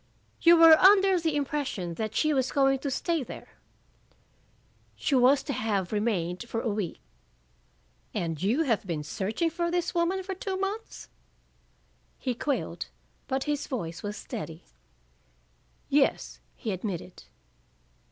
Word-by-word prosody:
"You 340 0 +7
were 325 -1 +9
under 385 -1 +6
the 320 -2 -1
impression 275 - -2
that 215 +4 -4
she 310 -1 +2
was 260 -2 +1
going 270 -1 +3
to 280 - -3
stay 330 +4 -1
there?" 255 - -9 1.5
"She - - -2
was 265 +2 +5
to 280 - -3
have 210 -7 -1
remained 205 -1 -1
for 225 - -2
a 230 - -1
week." 200 -5 -3 1.1
"And 165 -3 -3
you 235 - +2
have 225 -8 0
been 160 -4 -2
searching 210 - -2
for 340 +1 -1
this 350 -1 -1
woman 355 +2 0
for 385 +1 -4
two 380 0 -4
months?" 400 +4 -4 1.1
He 255 - -2
quailed, 275 +3 -3 0.4
but 265 0 -1
his 295 -1 -2
voice 170 -10 -4
was 205 0 -5
steady. - - -7 1.2
"Yes," - - +1 0.2
he 220 - -4
admitted. 185 -2 -5
265 Hz, 135 wpm, -28 LUFS, 205-330 Hz, 1.5 s, were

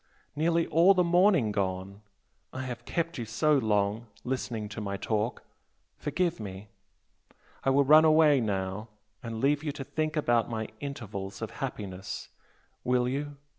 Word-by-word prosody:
nearly 165 +2 +2
all 175 +5 +6
the 180 - +4
morning 175 - +4
gone! 95 0 -3 0.5
I 130 - -5
have 120 -2 -6
kept 170 -1 -2
you 115 - -3
so 150 +8 +2
long 105 0 0 0.2
listening 120 -4 -3
to 105 +1 -6
my 100 -1 -3
talk 110 +3 -2 0.5
forgive 165 +2 -1
me! 100 -1 -7 0.9
I - - +2
will 140 +1 +4
run 155 +3 +7
away 155 -2 +6
now 100 0 -2 0.3
and 115 -1 -5
leave 145 +4 +2
you 150 - -1
to 140 - -6
think 155 +3 -2
about 120 -6 +2
my 110 -2 -3
'intervals' 105 -9 -6
of - - -4
happiness, 95 -1 -5 0.5
will 125 0 +2
you? 145 +2 -3
125 Hz, 150 wpm, -29 LUFS, 105-150 Hz, 0.9 s, run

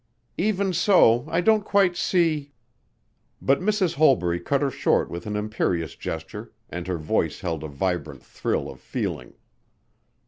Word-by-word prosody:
"Even 195 0 +1
so 160 - +4
I 165 +2 +1
don't 215 +2 +3
quite 195 -3 +2
see 160 -6 0 0.4
" - - -45 0.3
But 135 +1 +2
Mrs. 195 -3 +1
Holbury 120 - +3
cut 140 +11 0
her 140 - 0
short - - +1
with 85 +3 -6
an 105 - -3
imperious 105 -6 -1
gesture 80 +7 -7 0.2
and 85 0 -5
her 90 -2 -1
voice 75 -1 -1
held 80 -4 -3
a - - -4
vibrant 90 +5 -3
thrill - - -2
of - - -10
feeling. 60 - -5
135 Hz, 150 wpm, -24 LUFS, -, 0.4 s, so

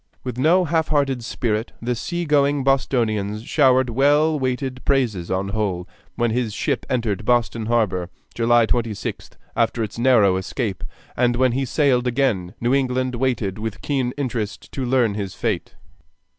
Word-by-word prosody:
With 125 -3 -4
no 175 +6 +4
half 160 0 +1
hearted 135 -5 0
spirit 115 -2 -2
the 120 +2 -1
seagoing 145 0 +1
Bostonians 110 -6 0
showered 130 -2 +3
well 145 +5 +3
weighed 130 0 -2
praises 115 -11 0
on 95 +1 -1
Hull 100 -4 -2 0.3
when 120 -1 +1
his 115 -3 -1
ship - - -2
entered 110 -5 -1
Boston 115 -1 +1
Harbor, 100 -7 0 0.2
July 120 0 +3
26th, 115 -2 -3 0.2
after 115 0 +1
its 110 +2 -6
narrow 115 -7 +4
escape, 100 +1 -3 0.3
and 120 0 +2
when 130 0 +3
he 135 +3 -1
sailed 130 -2 +2
again 115 -9 0
New 120 +2 +1
England 130 -1 0
waited 120 -6 -1
with 110 -1 -5
keen 130 -4 0
interest 120 -7 -4
to 135 - -4
learn 120 -4 +2
his 100 -2 -4
fate. - - -2
120 Hz, 150 wpm, -22 LUFS, 110-135 Hz, 0.3 s, no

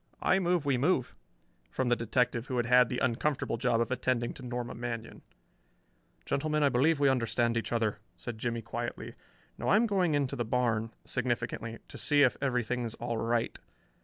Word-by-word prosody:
"I 190 - +4
move 175 -4 +1
we 135 -3 +2
move," 140 -3 +1 0.5
from 125 - -1
the 120 - +4
detective 120 +1 0
who 130 - -2
had 120 - +1
had 125 0 +5
the 125 - -2
uncomfortable 130 +3 0
job 120 -3 +1
of 115 +1 -1
attending 125 -1 0
to - - -11
Norma 120 0 -4
Manion. 115 -1 -5 1.0
"Gentleman, 150 +1 0
I 140 - +5
believe 140 +5 +3
we 140 - +4
understand 120 -2 +1
each 115 - -2
other," 110 -3 0 0.2
said 120 -3 -6
Jimmie 115 0 -2
quietly. 120 +1 -5 0.5
"Now - - -3
I - - +5
am 225 +3 +4
going 185 -7 +2
into 140 -1 0
the 120 - -1
barn" 115 -2 0
significantly 120 -2 -2
"to - - -10
see 145 -1 +4
if 130 - +4
everything's 125 -3 -1
all 115 - -3
right. 115 +1 -1
125 Hz, 180 wpm, -30 LUFS, 115-140 Hz, 1.0 s, had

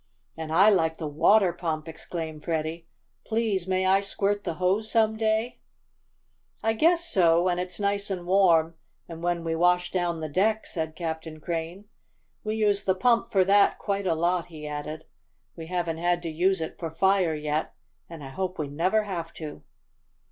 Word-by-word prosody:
"And 160 -1 -6
I 195 +6 +6
like 160 -4 +1
the 160 - -5
water 170 +6 +4
pump!" 165 -2 -3
exclaimed 160 -1 -6
Freddie. 165 0 -3 0.4
"Please 220 -5 -1
may 185 0 +1
I 190 +1 +4
squirt 200 +1 -1
the 170 -3 -2
hose 190 +5 0
some 220 -1 +3
day?" 220 +2 0 1.0
"I 225 - +2
guess 335 +8 +3
so, 170 - +4
when 180 -1 +1
it's 180 -1 -4
nice 200 0 -1
and 180 -3 -4
warm, 175 -4 +4 0.3
and 165 -1 -9
when 175 -1 -1
we 165 0 -1
wash 180 +1 +2
down 175 -2 -1
the 155 - -4
decks," 210 +8 0
said 160 -2 -3
Captain 160 -2 -5
Crane. 170 +4 -4 0.6
"We 215 0 -2
use 205 -2 +1
the 190 - +2
pump 235 +4 +2
for 190 -2 +4
that 200 +1 +4
quite 200 -1 -2
a 165 - +2
lot," 175 +1 0
he 155 -3 -10
added. 150 +1 -6 0.5
"We 165 -1 -8
haven't 170 -2 -2
had 175 0 0
to 165 - -3
use 180 +3 +1
it 160 - -5
for 165 - -3
fire 180 0 +2
yet, 150 +1 -2 0.3
and 165 -3 -9
I 135 - -7
hope 185 +6 -4
we 150 -2 -3
never 185 +9 +1
have 170 -5 -5
to." 155 -2 -8
175 Hz, 180 wpm, -26 LUFS, 160-200 Hz, 1.0 s, I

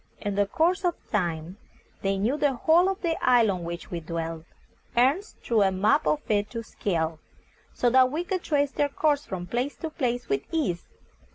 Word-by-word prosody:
In 205 - -3
the 200 0 +1
course 340 - +1
of 350 -2 +1 0.2
time 175 -3 -2 0.4
they 195 0 0
knew 220 +8 +1
the 290 -2 +2
whole 335 +8 +4
of 390 0 -4
the 330 -2 -1
isle 240 -4 +5
on 180 -2 -4
which 170 +1 -6
we 175 - -2
dwelt. 165 0 -5 0.5
Ernest 280 - +2
drew 225 -3 +2
a 195 -1 +4
map 210 +11 +2
of 300 - +2
it 205 -1 +1
to 230 -1 -5
scale, 165 -7 -2 0.6
so 245 - +2
that 255 0 +6
we 320 +4 -1
could 370 0 -2
trace 285 -3 +1
their 290 0 0
course 290 0 +1
from 185 -5 -4
place 245 +9 -2
to 320 - -5
place 245 -5 -2
with 135 0 0
ease. 190 - -1
235 Hz, 195 wpm, -26 LUFS, 185-295 Hz, 0.6 s, that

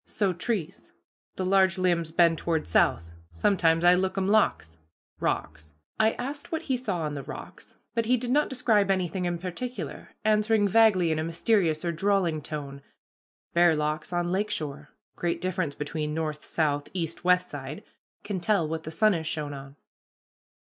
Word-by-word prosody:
So 195 -3 0
trees 185 -2 -4 0.4
the 185 - -2
large 190 -1 +3
limbs 175 -3 +1
bend 165 0 +3
toward 165 -2 -1
south. 85 0 +2 0.2
Sometimes 165 - +2
I 175 - +8
lookum 190 +1 0
locks" 80 - +1 0.4
(rocks). 75 0 -3 0.2
I 220 0 +4
asked 280 +4 -6
what 325 0 -2
he 265 - 0
saw 205 -9 -2
on 150 -2 -2
the 140 - -4
rocks, - - -10 0.2
but 230 -2 0
he 250 +1 +4
did 245 +1 -3
not 295 +3 +3
describe 225 -6 +2
anything 185 -1 0
in 175 -1 -1
particular, 185 - -6 0.2
answering 215 0 +3
vaguely, 195 -5 +4
in 155 - 0
a - - -1
mysterious 170 -1 +1
or 170 - +1
drawling 175 -2 +1
tone, 140 -2 -6 0.7
"bare 170 -1 +5
locks 150 +2 -2
on 175 0 0
lake 205 +3 0
shore 150 -6 -4 0.3
great 175 -1 -1
difference 185 -5 -2
between 150 +1 -3
north, 155 -2 -3
south, 145 -3 -1
east, 165 -2 -3
west 180 0 +3
side 145 +1 -7 0.4
can 200 -3 -3
tell 175 -2 +1
what 160 +1 -3
the - - -4
sun 215 +6 +3
has 160 -3 -3
shone 150 -2 -3
on." 135 0 -10
175 Hz, 170 wpm, -27 LUFS, 155-200 Hz, 0.7 s, I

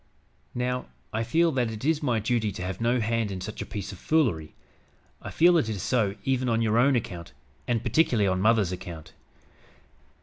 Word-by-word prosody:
"Now, 125 +1 -2 0.3
I 110 +1 0
feel 165 +8 +2
that 125 -5 0
it 110 +3 -6
is 155 -1 +2
my 125 -6 +1
duty 110 -1 0
to 90 - -6
have 95 +2 -5
no 120 +2 +2
hand 115 -1 0
in 95 -2 -5
such 105 +4 -6
a - - -6
piece 100 -1 -5
of 95 - -11
foolery. 115 - 0 0.7
I - - -7
feel 170 +1 +5
it 115 - -1
is 100 -5 -3
so 110 -6 +1
even 130 -2 0
on 115 -1 +2
your 110 +1 +2
own 135 +2 +4
account, 90 -7 -4 0.3
and 120 -2 0
particularly 120 -4 +2
on 95 0 0
mother's 110 -3 +3
account. 85 -4 -8
115 Hz, 195 wpm, -26 LUFS, 100-125 Hz, 0.7 s, feel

